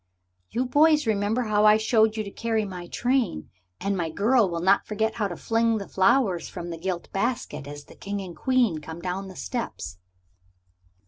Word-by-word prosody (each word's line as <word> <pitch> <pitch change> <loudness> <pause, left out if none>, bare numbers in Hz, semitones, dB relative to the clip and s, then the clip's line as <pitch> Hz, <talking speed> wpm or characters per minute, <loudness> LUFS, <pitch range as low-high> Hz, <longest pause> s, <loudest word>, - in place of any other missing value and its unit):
"you 250 +2 -1
boys 300 +3 +4
remember 215 +2 +1
how 210 -2 +2
I 215 0 +7
showed 220 0 +2
you 215 - -1
to 200 - -8
carry 225 -1 -1
my 180 -3 -7
train. 245 - -1 0.3
And 200 +1 -1
my 170 -3 -1
girl 215 +5 +3
will 170 -1 -3
not 190 +3 +3
forget 220 +1 0
how 215 -3 -1
to 175 - -6
fling 230 0 +1
the 200 - -6
flowers 190 -2 +2
from 175 0 -6
the 165 - -5
gilt 180 0 -4
basket 195 - -2
as 145 0 -9
the - - -15
King 200 +1 -5
and 185 -3 -7
Queen 245 -11 +1
come 160 +2 -8
down 185 +2 -4
the 190 - -10
steps." 225 - -5
205 Hz, 190 wpm, -25 LUFS, 180-230 Hz, 0.3 s, I